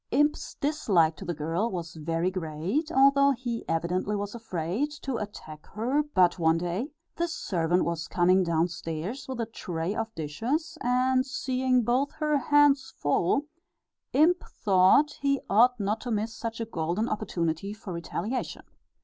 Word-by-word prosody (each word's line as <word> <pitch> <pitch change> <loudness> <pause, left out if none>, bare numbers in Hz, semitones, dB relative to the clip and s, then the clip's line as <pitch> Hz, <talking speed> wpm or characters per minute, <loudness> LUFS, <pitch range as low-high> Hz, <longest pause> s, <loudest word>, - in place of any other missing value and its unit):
Imp's 295 +3 +1
dislike 200 - +2
to 195 - -8
the 175 - -2
girl 165 +9 -1
was 170 -4 -5
very 165 +3 -1
great, 185 - -2
although 275 0 +5
he 240 -2 -4
evidently 175 +5 0
was 205 0 -4
afraid 220 - -2
to 275 -4 -4
attack 155 -8 -8
her, 250 +8 +1
but 180 -1 +4
one 160 0 +3
day 175 - -2 0.3
this 335 -1 -1
servant 175 -1 0
was 170 -1 -3
coming 185 +1 +3
downstairs 170 - -2
with 260 -2 -5
a 230 - 0
tray 175 -5 -4
of 225 0 -3
dishes, 250 - -2
and 255 +1 +2
seeing 255 -1 0
both 255 +5 +1
her 305 -1 0
hands 285 -1 +3
full, 170 - +1 0.7
Imp 345 +5 +4 0.2
thought 200 +10 +4
he 275 -1 +2
ought 240 +4 +5
not 210 +2 -1
to 250 - -5
miss 220 0 -1
such 230 -1 -5
a 230 - -2
golden 180 +2 -2
opportunity 185 -4 -2
for 205 -3 -7
retaliation. 180 +8 -4
215 Hz, 150 wpm, -27 LUFS, 170-260 Hz, 0.7 s, although